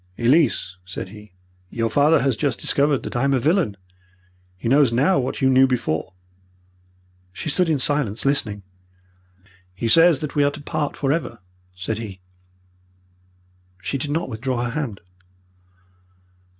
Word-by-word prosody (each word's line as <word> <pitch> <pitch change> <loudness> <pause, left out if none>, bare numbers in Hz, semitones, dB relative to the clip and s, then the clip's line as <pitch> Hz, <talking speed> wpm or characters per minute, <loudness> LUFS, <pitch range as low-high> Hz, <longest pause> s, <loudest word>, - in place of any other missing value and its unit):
"'Elise,' 120 - +2
said 95 0 -7
he, 105 0 -13 0.4
'your 115 -1 -1
father 145 +6 +3
has 135 -3 +1
just 135 -2 -1
discovered 140 -1 +1
that - - -6
I 120 - 0
am 140 0 +2
a - - +2
villain. 145 - +1 0.8
He 95 - -5
knows 135 0 +4
now 140 +10 +3
what 130 - -3
you 130 - +5
knew 130 +1 +6
before.' 95 -8 -2 1.2
"She 100 - -5
stood 180 +3 +1
in 155 - +2
silence, 140 -7 0
listening. 105 -8 0 1.1
"'He 115 - -2
says 165 +4 +5
that 150 - -4
we 145 - +2
are 145 - +4
to 145 +1 -9
part 150 0 -3
for 140 -1 +1
ever,' 150 -7 -3 0.4
said 95 +4 -4
he. 100 -5 -7 1.6
"She 135 +8 -3
did 145 - -3
not 160 +4 -1
withdraw 125 +1 -3
her 120 - -3
hand. 130 -8 -4
135 Hz, 150 wpm, -22 LUFS, 110-145 Hz, 1.6 s, knew